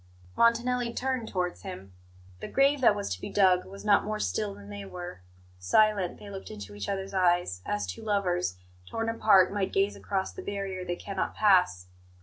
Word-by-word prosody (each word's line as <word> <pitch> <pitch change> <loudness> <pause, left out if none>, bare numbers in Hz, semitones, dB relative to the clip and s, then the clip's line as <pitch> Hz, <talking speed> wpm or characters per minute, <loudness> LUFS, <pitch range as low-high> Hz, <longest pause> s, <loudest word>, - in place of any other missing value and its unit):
Montanelli 235 +1 +2
turned 255 -3 -1
towards 180 -2 -2
him. 180 - -9 0.5
The - - -6
grave 275 +1 +3
that 225 -4 +6
was 205 - -3
to 90 - -8
be - - -5
dug 185 -3 +4
was 195 +2 -11
not 205 -1 +5
more 215 0 -3
still 100 +2 -1
than 100 0 -12
they 100 0 -6
were. 175 - -8 0.4
Silent, 195 - +2
they 205 - -10
looked 195 -1 -8
into 105 -1 -8
each 100 -1 -5
other's 195 0 -3
eyes, 175 - +2
as 105 0 -1
two 90 -1 -7
lovers, 180 - 0 0.3
torn 225 0 -2
apart, 205 -4 +4
might 200 -2 -1
gaze 195 +1 +1
across 190 -2 -2
the - - -7
barrier 195 -2 -4
they 175 -1 -3
cannot 195 +1 -4
pass. 180 - +3
190 Hz, 185 wpm, -28 LUFS, 175-210 Hz, 0.5 s, that